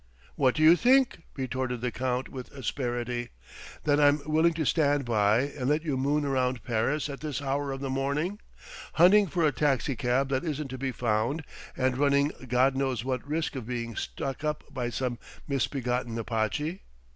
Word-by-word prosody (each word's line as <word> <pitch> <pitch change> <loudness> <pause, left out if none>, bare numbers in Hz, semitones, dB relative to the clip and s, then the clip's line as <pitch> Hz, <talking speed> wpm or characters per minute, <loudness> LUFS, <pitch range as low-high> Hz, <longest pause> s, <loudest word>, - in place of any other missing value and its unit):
"What 130 -3 +2
do 155 - +1
you 160 +2 +8
think?" 255 -2 +3
retorted 130 -2 -3
the 125 0 -1
Count 125 +2 -2
with 130 -2 -8
asperity 120 -1 -3 0.5
"that 145 0 +3
I'm 145 0 +5
willing 160 +2 +3
to 160 -2 -1
stand 145 -2 +2
by 110 -1 +3
and 140 -1 -3
let 150 +2 +1
you 150 -5 -1
moon 145 +3 +1
round 130 -4 0
Paris 120 +7 0
at 140 -2 -6
this 150 -3 -3
hour 140 0 -1
of 135 0 -5
the 135 - -3
morning, 145 +9 -1 0.5
hunting 195 +5 +6
for 170 0 +1
a 150 - +4
taxicab 135 -1 +1
that 130 -1 0
isn't 150 -3 -3
to 130 0 -6
be 135 0 -1
found 120 +6 0 0.3
and 130 0 +1
running 140 0 +3 0.2
God 130 +2 +3
knows 130 -4 -1
what 130 +1 -2
risk 155 0 -2
of 125 -4 -5
being 115 -2 -4
stuck 135 +6 -4
up 150 0 -1
by 125 -2 -2
some 120 0 -3 0.3
misbegotten 125 -3 -1
Apache? 115 - -2
135 Hz, 175 wpm, -28 LUFS, 125-150 Hz, 0.5 s, you